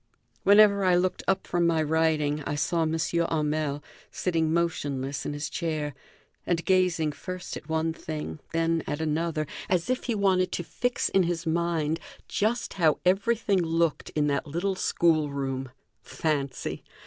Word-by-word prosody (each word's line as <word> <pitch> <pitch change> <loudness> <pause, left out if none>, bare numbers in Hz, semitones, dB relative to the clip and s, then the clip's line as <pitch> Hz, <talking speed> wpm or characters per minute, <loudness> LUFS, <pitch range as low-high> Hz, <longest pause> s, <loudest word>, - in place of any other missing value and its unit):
Whenever 200 0 +6
I 185 -1 +4
looked 180 +1 +1
up 190 - +1
from 175 -1 +1
my 160 -2 +2
writing 155 -1 +1
I 145 - -1
saw 165 +3 0
M. 160 0 +1
Hamel 155 -3 0 0.3
sitting 165 -3 0
motionless 145 -5 -1
in - - -2
his 145 +1 -3
chair 155 -4 -2 0.5
and 170 -2 -1
gazing 180 -5 +2
first 185 +4 -6
at 150 - -9
one 160 0 0
thing, 155 - -6
then 165 0 +1
at 145 +1 -2
another, 160 0 -1 0.2
as 180 +6 +1
if 255 - -2
he 235 - 0
wanted 185 -3 +2
to 175 - -2
fix 245 +8 -1
in 195 - +3
his 170 -1 -1
mind 165 -1 0 0.3
just 225 +4 -1
how 155 -2 +4
everything 200 +1 +2
looked 165 -1 0
in 150 -1 +2
that 145 +2 0
little 175 +7 -1
school 160 -4 +2
room. 135 -2 -3 0.3
Fancy! 140 0 -2
165 Hz, 155 wpm, -27 LUFS, 150-180 Hz, 0.5 s, Whenever